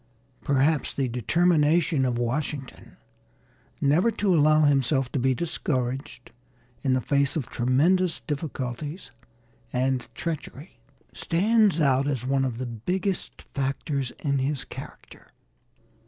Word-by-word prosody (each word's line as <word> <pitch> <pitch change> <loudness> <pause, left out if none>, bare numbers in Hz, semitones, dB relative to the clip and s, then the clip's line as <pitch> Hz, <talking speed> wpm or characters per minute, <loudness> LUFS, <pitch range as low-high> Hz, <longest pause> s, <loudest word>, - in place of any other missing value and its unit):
Perhaps 140 +1 +1
the 135 -2 0
determination 155 - +2
of 125 -2 0
Washington 135 +3 -4 0.8
never 155 +10 +3
to 205 -3 +1
allow 155 -1 +5
himself 135 -2 +2
to 140 - -1
be 130 +1 +2
discouraged 130 -5 -3 0.5
in 130 0 +1
the 130 - +1
face 140 +3 +1
of 145 -7 -2
tremendous 160 +9 +2
difficulties 145 +1 -5 0.6
and 130 -1 0
treachery 155 -3 -6 0.3
stands 205 +1 +2
out 135 -2 +3
as 130 -4 -2
one 135 0 +1
of 120 -3 -3
the 130 - -3
biggest 180 - -3
factors 135 -1 -2
in 140 -3 +1
his 135 +1 -2
character. - - -11
140 Hz, 115 wpm, -26 LUFS, 130-160 Hz, 0.8 s, allow